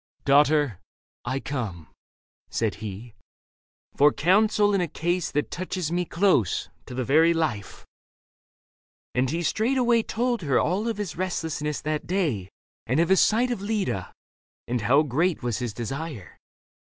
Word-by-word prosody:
" - - -42
Daughter, 145 - +3 0.5
I 135 - -1
come," 105 - -5 0.6
said 110 -3 -1
he, 110 +2 -7 0.4
" - - -47
For 145 +1 +6
counsel 205 +5 +3
in 195 - +2
a 175 - 0
case 175 +3 -1
that 150 - -2
touches 180 -2 -3
me 175 +1 0
Close, 170 - +1 0.2
to 125 - -7
the 130 - -1
very 160 +6 +4
life." 115 -12 -3 1.3
And 125 +1 +1
he 170 +3 -2
straightway 235 +4 +2
Told 235 0 -1
her 140 -5 +1
of - - +3
all 190 +6 0
his 205 -8 -3
restlessness 160 -5 -2
that 155 0 -3
day 150 - -1 0.4
And 130 +6 +1
of 170 - +2
his 190 - +5
sight 240 +4 +3
of 235 - -3
Leda, 200 - -2 0.6
and 120 -1 -1
how 135 +8 +4
great 155 +4 0
Was 120 -2 -1
his 120 -3 -3
desire. 125 - -6
155 Hz, 155 wpm, -25 LUFS, 125-185 Hz, 1.3 s, For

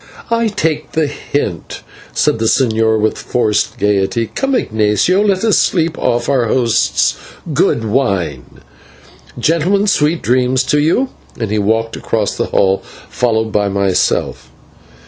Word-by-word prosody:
"I 230 0 +2
take 160 -8 -2
the 160 -1 +1
hint," 140 - -4 0.3
said 115 - +1
the 115 - -1
señor, 110 -3 +2
with 110 +1 0
forced 105 -4 -1
gaiety. 105 +3 0
"Come, 270 0 0
Ignatio, 110 - +1
let 200 -2 +1
us 220 -2 +3
sleep 165 -2 +1
off 120 0 0
our 130 -4 +2
host's 115 0 +1 0.4
good 115 - +1
wine. 95 - -2 0.8
Gentlemen, 170 - +1
sweet 165 -4 +1
dreams 125 +1 +2
to 150 +3 +1
you," 170 - +1 0.3
and 110 -3 -3
he 105 - +1
walked 110 +2 0
across - - -2
the - - -2
hall, 95 0 +2 0.3
followed 110 -2 0
by 105 -1 +1
myself. 100 -1 0
120 Hz, 135 wpm, -15 LUFS, 105-160 Hz, 0.8 s, us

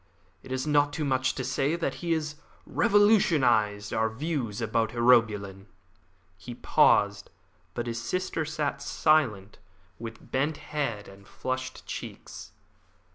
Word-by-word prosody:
It 130 - -12
is 130 +1 -2
not 145 -1 +2
too 155 - -2
much 130 -1 +1
to 130 - -3
say 135 +5 0
that 170 - -2
he 170 -1 -2
has 155 -2 -2 0.3
revolutionised 145 - +3
our 110 0 +1
views 125 -3 -3
about 115 0 0
urobilin." 105 -5 +2 0.7
He 120 +3 -8
paused, 100 -3 +3 0.5
but 120 - -3
his 115 -1 -4
sister 175 +5 -2
sat 150 -2 -3
silent, 105 -12 +1 0.4
with 115 0 -9
bent 145 +4 0 0.2
head 115 -9 -2
and 100 +1 -15
flushed 130 0 -5
cheeks. - - -8
130 Hz, 130 wpm, -27 LUFS, 110-150 Hz, 0.7 s, revolutionised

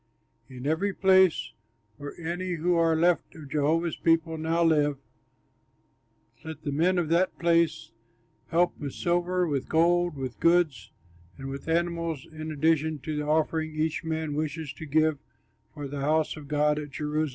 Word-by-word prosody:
In 130 0 -9
every 175 +7 0
place 190 -3 +4 0.5
where 145 +3 -8
any 175 +2 -3
who 175 +2 0
are 165 -1 +3
left 170 +2 +1
of 150 -4 -11
Jehovah's 160 +3 +1
people 165 -1 +2
now 165 +2 0
live, 150 -3 +2 1.5
let 160 -1 -8
the 145 - -2
men 170 +6 +2
of 175 -3 +1
that 175 +3 +2
place 170 -1 +1 0.6
help 175 +2 +2
with 140 -3 -5
silver, 175 0 0
with 140 -4 -2
gold, 175 0 +2
with 130 -2 -5
goods, 165 - +2 0.5
and 135 -1 -7
with 140 +2 -7
animals, 170 -3 -1
in 155 0 -7
addition 155 +1 +1
to 155 +3 -4
the 150 0 -3
offering 155 0 0
each 155 +1 -1
man 160 -2 -2
wishes 150 0 -3
to 160 - -9
give 155 0 +2 0.5
for 145 -1 -7
the 140 0 -5
house 155 +2 +1
of 150 -2 -10
God 150 +1 +1
at 145 -1 -7
Jerusalem.'" 150 +2 -2
160 Hz, 160 wpm, -27 LUFS, 150-170 Hz, 1.5 s, place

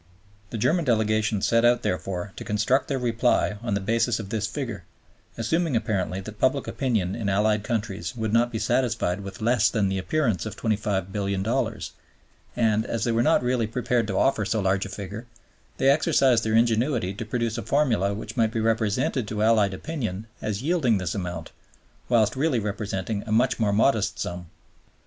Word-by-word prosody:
The 115 - -5
German 165 +10 +2
Delegation 110 -4 +1
set 115 0 +3
out, 120 0 +4
therefore, 90 +1 -3
to - - -7
construct 110 +6 +1
their 135 - -1
reply 120 -3 +1
on 120 -4 -1
the - - 0
basis 115 +3 +1
of 100 -3 -6
this 105 -1 -1
figure, 115 -5 -5 0.5
assuming 160 +5 0
apparently 95 -4 -1
that 105 +2 -10
public 135 +2 +1
opinion 110 -9 -1
in 110 -4 -2
Allied 105 +1 +2
countries 105 -7 -3
would 110 -2 -2
not 120 +1 +3
be 115 - -3
satisfied 110 -5 0
with 100 +1 -8
less 120 -1 +3
than 105 -4 +1
the 95 0 -1
appearance 110 - 0
of 110 - -6
$25,000,000,000; 100 +2 -1 0.6
and, 110 -2 +2
as 115 -1 -3
they 120 - +1
were 115 +1 +2
not 155 +1 +3
really 125 -2 +1
prepared 120 0 0
to 95 -2 -2
offer 135 -5 +2
so 110 +2 0
large 95 -1 +1
a - - -11
figure, 100 +4 -7 0.5
they 135 - +4
exercised 135 -6 +3
their 110 0 +1
ingenuity 115 -3 +2
to 100 - -5
produce 115 +1 -2
a - - -3
formula 115 -10 +1
which 105 +2 -6
might 115 -2 +2
be 115 - -2
represented 110 +2 0
to 105 0 -2
Allied 105 -3 +3
opinion 110 - -4 0.2
as 105 +2 -3
yielding 145 - +2
this 90 -3 -2
amount, 90 -4 -5 0.6
whilst 110 -2 +3
really 135 -2 +1
representing 105 -1 -3
a - - -4
much 120 +4 +2
more 105 -2 +2
modest 110 0 +2
sum. 90 0 -5
110 Hz, 180 wpm, -25 LUFS, 100-120 Hz, 0.6 s, out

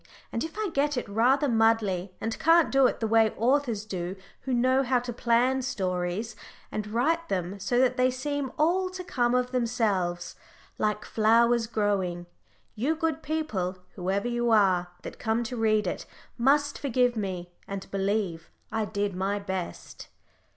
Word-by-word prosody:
And 230 - -2
if 325 +5 -7
I 430 -4 -1
get 290 0 +1
it 245 - -2
rather 250 +8 +3
muddley, 225 -6 +2
and 225 +5 -3
can't 330 +1 +5
do 270 -1 +5
it - - -3
the 225 - +1
way 225 0 +4
authors 235 -3 +1
do 185 -2 -4 0.2
who 265 - -5
know 255 +2 +3
how 255 -1 +2
to 245 0 -3
plan 245 +3 +2
stories, 190 -1 -2 0.4
and 210 -1 -3
write 315 +10 0
them 190 +1 -2
so 200 +5 0
that 255 0 +3
they 255 0 +4
seem 270 +1 -3
all 365 +4 +2
to 365 0 -7
come 245 -7 +1
of 250 0 0
themselves, 215 -8 -1 0.4
like 210 0 0
flowers 230 +1 +3
growing, 195 -6 -1 0.5
you 265 +9 0
good 320 -1 -1
people, 255 - -2 0.2
whoever 195 +4 -1
you 240 0 0
are, 190 -5 +4 0.2
that - - -8
come 225 +2 0
to 235 +2 -5
read 215 -2 +2
it 180 - -4 0.3
must 285 +4 +2
forgive 250 -3 +1
me 185 -4 -4 0.2
and 195 -1 -5
believe 195 -4 -1 0.2
I 220 0 0
did 205 -2 -2
my 195 +2 -1
best. 190 -3 -6
225 Hz, 165 wpm, -27 LUFS, 200-255 Hz, 0.5 s, can't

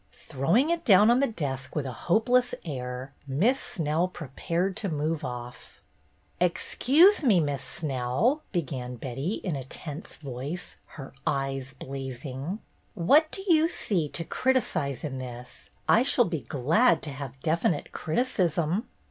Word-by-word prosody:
Throwing 205 - +1
it 340 -1 -1
down 210 - +7
on 245 - +4
the 275 - +3
desk 140 - -4
with 150 -3 -1
a 130 - -3
hope 175 - 0
less 250 0 +3
air. 130 -2 -5
Miss 190 - +2
Snell 160 +1 0
prepared 175 +3 -3
to 210 -3 -2
move 155 0 -1
oflf. 125 -2 -7 0.6
"Excuse 285 - +4
me. 215 -9 +5
Miss 145 -4 -1
Snell," 135 - 0
began 130 -8 -3
Betty, 135 - -3
in 180 -6 -1
a 135 - -4
tense 150 +4 -7
voice, 140 +4 -6 0.2
her 135 -2 -8
eyes 135 -1 -1
blazing. 135 - -5 0.4
"What 285 - +4
do 385 - -5
you 325 -2 +5
see 175 - -1
to 165 - -4
criticise 190 - 0
in 135 -4 -4
this? 125 -1 -9 0.2
I 230 - +6
shall 255 -2 +4
be 165 -6 -3
glad 155 - +2
to 150 - -4
have 135 -1 -7
definite 160 -1 0
criticism." 175 - 0
155 Hz, 145 wpm, -27 LUFS, 135-210 Hz, 0.6 s, down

